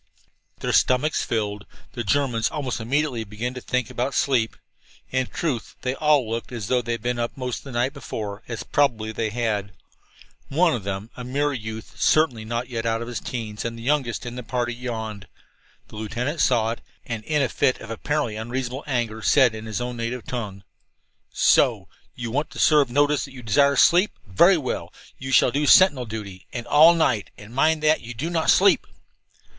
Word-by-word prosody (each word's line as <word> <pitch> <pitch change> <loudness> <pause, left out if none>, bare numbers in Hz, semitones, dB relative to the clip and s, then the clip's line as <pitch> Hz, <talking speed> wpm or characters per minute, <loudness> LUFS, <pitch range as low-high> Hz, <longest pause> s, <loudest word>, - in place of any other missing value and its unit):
Their - - -1
stomachs 135 +4 +2
filled, 105 -3 -2 0.3
the 120 - -3
Germans 120 0 +1
almost 135 -6 -3
immediately 130 +1 0
began 110 +4 -5
to 125 - -7
think 125 -2 -2
about 130 +3 -2
sleep. 120 -5 +1 0.6
In 130 -1 0
truth, 135 -10 -3
they 125 - 0
all 150 -4 +2
looked 115 +3 -4
as 115 -4 -5
though 125 -1 +3
they 120 -1 -3
had 115 -1 -5
been 120 0 -1
up 120 0 -2
all 125 -1 -3
of 125 - -4
the 135 - -10
night 125 +3 0
before, 105 -7 -6
as 115 -4 -5
probably 115 -7 +1
they 110 0 -2
had. 105 -4 -2 0.8
One 165 +4 +3
of 110 - -3
them, 100 +3 -4
a 125 - -7
mere 140 +4 0
youth 110 -2 -7
certainly 145 -8 +3
not 120 +2 -3
yet 115 -3 -4
out 115 0 0
of - - -8
his 120 - -4
teens 110 -4 -5
and 115 0 -4
the 115 - -9
youngest 130 -3 0
in 120 0 -6
the 125 - -5
party, 120 0 -2
yawned. 110 -4 -5 0.6
The - - -11
lieutenant 125 +8 -3
saw 115 -3 +3
it, 115 - -6 0.2
and 115 -2 -4
in 150 -2 +1
a - - +2
fit 130 +2 +1
of 115 - -9
apparently 140 -1 -2
unreasonable 125 +4 -4
anger 115 -5 -2
said, 130 -1 +4
in 110 0 -7
his 110 0 -3
native 120 0 -4
tongue: 105 -6 -5 0.7
"So! - - +3 0.3
You 115 -2 -5
want 145 +5 -1
to - - -12
serve 150 -4 +5
notice 145 +3 +2
that 135 - -13
you 125 -2 -10
desire 140 +6 +3
to - - +2
sleep? 180 +5 +4
Very 170 - +5
well, 135 -5 -4 0.3
you 135 0 -5
shall 125 - +5
do 145 +2 0
sentinel 145 -7 +6
duty 100 -4 -7
and 120 -1 -5
all 160 +3 +7
night. 125 -11 +1
And 105 +2 -12
mind 155 +4 +2
that 155 +1 +3
you 120 +1 -8
do 155 +9 -3
not 165 -2 0
sleep!" - - +5
120 Hz, 195 wpm, -24 LUFS, 110-140 Hz, 0.8 s, all